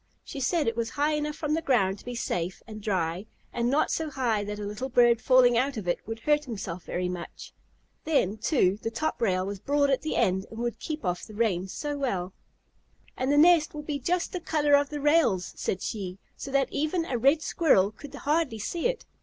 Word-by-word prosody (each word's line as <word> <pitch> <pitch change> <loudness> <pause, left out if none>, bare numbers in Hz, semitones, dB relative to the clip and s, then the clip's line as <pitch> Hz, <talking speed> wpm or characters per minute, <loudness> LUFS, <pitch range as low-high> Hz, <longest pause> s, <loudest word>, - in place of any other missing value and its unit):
She 280 - -7
said 305 +3 +1
it 230 - 0
was 230 -1 -1
high 295 +4 0
enough 300 0 -2
from 305 -1 -2
the 325 - +1
ground 200 -10 +1
to - - -16
be 245 0 -5
safe 180 -6 -3
and 215 -2 -9
dry, 185 -1 -1 0.3
and 240 0 0
not 285 +4 +2
so 320 -1 -1
high 240 -7 0
that 210 0 -5
a 210 - -5
little 210 +6 -4
bird 240 -2 +4
falling 250 -2 +5
out 265 0 -1
of 200 -5 -5
it 175 - +1
would 225 0 -5
hurt 295 +3 +2
himself 195 -7 -6
very 180 0 -2
much. 180 -1 -7 0.5
Then, 220 - +1
too, 210 - +2
the - - -2
top 310 +8 -3
rail 185 -4 +1
was 200 0 -5
broad 285 +4 +2
at 265 - +1
the 310 - -3
end 190 +1 +1
and 225 - -10
would 235 -1 -3
keep 310 -3 -5
the 180 +3 -3
rain 200 -5 +1
off - - -11
so 290 +7 -4
well. 190 -9 -2 0.8
"And 260 +2 -1
the 290 - +3
nest 320 -1 +5
will 300 - -5
be 290 -1 -3
just 345 +6 -1
the 365 - -2
color 300 -3 +1
of 285 0 +5
the 295 - -4
rails," 295 - +2
said 185 - -3
she, 190 -4 -4 0.2
"so - - -7
that 275 -1 +1
even 320 +3 0
a 245 -7 -2
Red 280 +6 +3
Squirrel 205 - +3
could 285 +5 -11
hardly 295 -5 0
see 335 - -1
it." - - -4
245 Hz, 225 wpm, -27 LUFS, 205-295 Hz, 0.8 s, falling